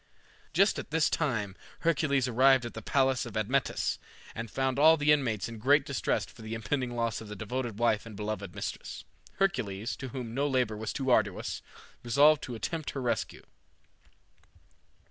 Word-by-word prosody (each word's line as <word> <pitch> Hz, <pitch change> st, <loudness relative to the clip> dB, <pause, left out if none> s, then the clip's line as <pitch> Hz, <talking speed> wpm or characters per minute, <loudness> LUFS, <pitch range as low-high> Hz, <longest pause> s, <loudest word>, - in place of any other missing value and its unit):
Just 195 Hz, +5 st, +3 dB
at -, -, -7 dB
this 155 Hz, 0 st, +2 dB
time 110 Hz, -, -1 dB, 0.3 s
Hercules 140 Hz, -5 st, +2 dB
arrived 130 Hz, +1 st, +4 dB
at 120 Hz, -, -6 dB
the 115 Hz, -, -7 dB
palace 135 Hz, +1 st, +2 dB
of 110 Hz, -, -6 dB
Admetus, 125 Hz, +6 st, 0 dB, 0.3 s
and 115 Hz, 0 st, -5 dB
found 135 Hz, +2 st, -1 dB
all 160 Hz, +2 st, +7 dB
the 150 Hz, 0 st, +3 dB
inmates 125 Hz, -9 st, +1 dB
in 115 Hz, -1 st, -8 dB
great 140 Hz, +4 st, +4 dB
distress 140 Hz, -, -1 dB
for -, -, -15 dB
the 110 Hz, +1 st, -5 dB
impending 120 Hz, +3 st, -2 dB
loss 115 Hz, -1 st, -1 dB
of 110 Hz, -, -9 dB
the 105 Hz, -, -7 dB
devoted 115 Hz, +2 st, -4 dB
wife 115 Hz, -1 st, +1 dB
and 110 Hz, -, -9 dB
beloved 105 Hz, +1 st, -4 dB
mistress. -, -, -5 dB, 0.3 s
Hercules, 115 Hz, -, -1 dB
to 130 Hz, -, -6 dB
whom 125 Hz, -3 st, -6 dB
no 140 Hz, +3 st, +1 dB
labor 125 Hz, -5 st, +1 dB
was 110 Hz, +1 st, -4 dB
too 135 Hz, -2 st, -1 dB
arduous, 105 Hz, -5 st, +1 dB, 0.4 s
resolved 145 Hz, +5 st, +5 dB
to 125 Hz, -, -6 dB
attempt 155 Hz, +7 st, -3 dB
her 135 Hz, -, -3 dB
rescue. 120 Hz, -, -2 dB
125 Hz, 170 wpm, -30 LUFS, 110-140 Hz, 0.4 s, all